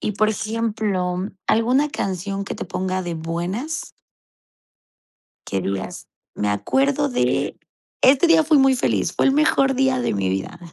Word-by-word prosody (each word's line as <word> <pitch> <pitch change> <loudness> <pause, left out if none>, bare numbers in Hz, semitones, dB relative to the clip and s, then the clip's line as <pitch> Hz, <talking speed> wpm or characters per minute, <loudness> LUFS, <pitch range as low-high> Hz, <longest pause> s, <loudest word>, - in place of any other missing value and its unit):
Y, 210 - -2
por 215 +2 +2
ejemplo, 215 -4 -1 0.3
¿alguna 250 +6 +3
canción 195 -2 -3
que - - -5
te - - -5
ponga 185 +1 -2
de 175 -1 -4
buenas? 180 - -4 1.6
Qué 95 -1 -1
dígas: 95 0 -5 0.3
"Me 105 - -1
acuerdo 270 - +1
de 245 - 0 0.5
este 270 +5 +5
día, 325 -1 +5
fui 305 -1 +4
muy 270 0 +5
feliz, 245 - 0
fue - - +2
el 270 - +4
mejor 275 -2 +3
día 265 -1 +2
de - - -1
mi 100 -2 -1
vida". 95 - -3
215 Hz, 150 wpm, -21 LUFS, 180-270 Hz, 1.6 s, este